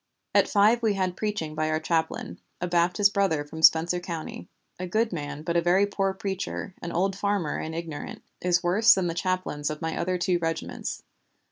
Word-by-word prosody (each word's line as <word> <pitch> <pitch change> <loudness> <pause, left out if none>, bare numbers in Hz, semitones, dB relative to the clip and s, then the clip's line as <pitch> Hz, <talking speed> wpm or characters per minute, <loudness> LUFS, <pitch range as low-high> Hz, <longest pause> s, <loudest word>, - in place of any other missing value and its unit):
"At - - +4
five 215 +3 +4
we 220 -3 +2
had 185 -2 -1
preaching 210 -8 -3
by 155 0 -1
our 155 0 +1
chaplain, 160 0 -2 0.2
a 180 - -1
Baptist 180 +4 +3
brother 175 -7 +1
from 160 +2 -8
Spencer 165 +2 +5
County, 170 -3 -6 0.3
a 185 - -3
good 220 +3 0
man 145 -2 -5
but 170 +1 -2
a 170 - +4
very 180 +4 +4
poor 195 -1 0
preacher, 190 0 -4
an 170 - -5
old 190 +2 0
farmer 200 -5 -1
and 160 +1 -5
ignorant; 165 -3 -6 0.2
is 180 0 +2
worse 205 +6 +5
than 190 -2 0
the 170 - -1
chaplains 185 -5 -2
of 150 0 -5
my 160 -1 -3
other 185 +1 -1
two 175 0 +1
regiments. 165 -1 -4
175 Hz, 195 wpm, -26 LUFS, 160-195 Hz, 0.3 s, Spencer